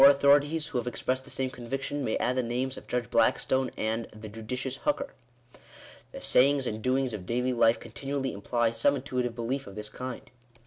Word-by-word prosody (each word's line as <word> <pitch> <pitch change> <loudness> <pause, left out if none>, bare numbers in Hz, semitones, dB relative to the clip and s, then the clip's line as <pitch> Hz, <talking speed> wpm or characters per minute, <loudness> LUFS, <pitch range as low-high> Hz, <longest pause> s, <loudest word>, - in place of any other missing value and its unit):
authorities 145 +3 +4
who 125 - -1
have 120 - -5
expressed 130 +1 -1
the - - -8
same 130 -1 -1
conviction, 135 +3 -3
may 110 - 0
add 125 - 0
the 130 - +2
names 125 +2 -2
of - - -11
Judge 125 -1 -2
Blackstone 125 +2 +3
and 110 +1 -1
" - - -23
the 110 - -7
judicious 125 +5 -3
Hooker." 285 -1 -1 1.0
The - - -7
sayings 140 +1 +4
and 110 -2 -3
doings 130 0 +1
of 95 -4 -6
daily 125 +2 +1
life 115 -1 +4
continually 135 +3 -3
imply 115 +3 0
some 115 +5 +3
intuitive 125 -3 -2
belief 125 +3 -2
of 95 - -9
this 105 0 -5
kind. 125 +2 -7
125 Hz, 190 wpm, -29 LUFS, 115-135 Hz, 1.0 s, authorities